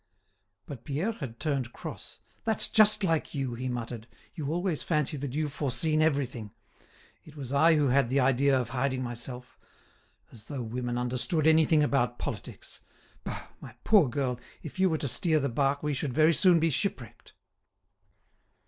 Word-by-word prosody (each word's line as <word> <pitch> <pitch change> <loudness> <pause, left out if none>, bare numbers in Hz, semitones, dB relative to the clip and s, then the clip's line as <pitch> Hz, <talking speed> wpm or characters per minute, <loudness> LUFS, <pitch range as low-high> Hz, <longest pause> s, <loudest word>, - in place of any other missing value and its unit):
But 130 -5 -9
Pierre 155 +10 -1
had 130 - -8
turned 135 -6 -2
cross. - - -9 0.2
"That's 220 -1 +1
just 215 -1 +5
like 165 -4 0
you!" 135 -3 -2
he 125 +2 -4
muttered; 120 -2 -5 0.3
"you 150 -4 -4
always 175 -1 -1
fancy 150 -3 0
that 140 -1 -5
you've 150 -2 -2
foreseen 155 +3 0
everything. 130 -9 -1 0.7
It 155 - -15
was 140 -3 -6
I 160 +3 +5
who 145 -3 +2
had 130 -1 +3
the 135 +2 +2
idea 135 +1 +3
of 120 -2 -3
hiding 130 0 -1
myself. 125 +1 -8 0.7
As 110 -2 -13
though 140 -4 -4
women 120 +1 -3
understood 125 +6 0
anything 160 -1 +5
about 125 -4 +1
politics! - - -7 0.4
Bah, - - -6
my - - -11
poor 200 - +5
girl, 125 -1 -2 0.2
if 155 +4 -9
you 190 0 +4
were 160 - 0
to 145 - -3
steer 160 +4 +1
the 140 -1 -1
bark 140 +3 0
we 150 -1 0
should 135 -1 -3
very 155 +3 +4
soon 175 +1 +5
be 165 0 +2
shipwrecked." 135 - -3
140 Hz, 165 wpm, -28 LUFS, 125-155 Hz, 0.7 s, just